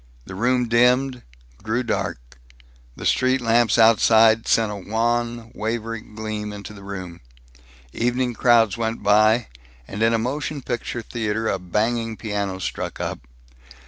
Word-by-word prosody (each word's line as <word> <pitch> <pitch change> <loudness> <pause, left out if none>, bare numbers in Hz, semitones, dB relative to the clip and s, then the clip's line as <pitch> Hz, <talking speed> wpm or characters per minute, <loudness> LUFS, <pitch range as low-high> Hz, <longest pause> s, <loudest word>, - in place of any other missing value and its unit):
The - - -9
room 120 +5 +1
dimmed, 125 +2 +2 0.4
grew 120 +3 -1
dark. - - -4 0.6
The - - -8
street 130 +1 +2
lamps 115 -2 +2
outside 110 0 +5
sent 110 -2 +2
a - - -5
wan, 115 +3 -2
wavery 115 +1 -3
gleam 105 -1 -6
into 105 +1 -9
the 100 - -12
room. 95 -3 -8 0.7
Evening 125 +1 0
crowds 115 -4 +3
went 115 0 -3
by, 110 +2 +4 0.4
and 105 - -6
in 115 0 +4
a 115 - +2
motion 140 +4 -3
picture 120 -1 -4
theater 110 -1 -2
a 95 - 0
banging 110 +5 -1
piano 100 -2 -3
struck 95 - -5
up. - - -3
115 Hz, 140 wpm, -22 LUFS, 105-120 Hz, 0.7 s, outside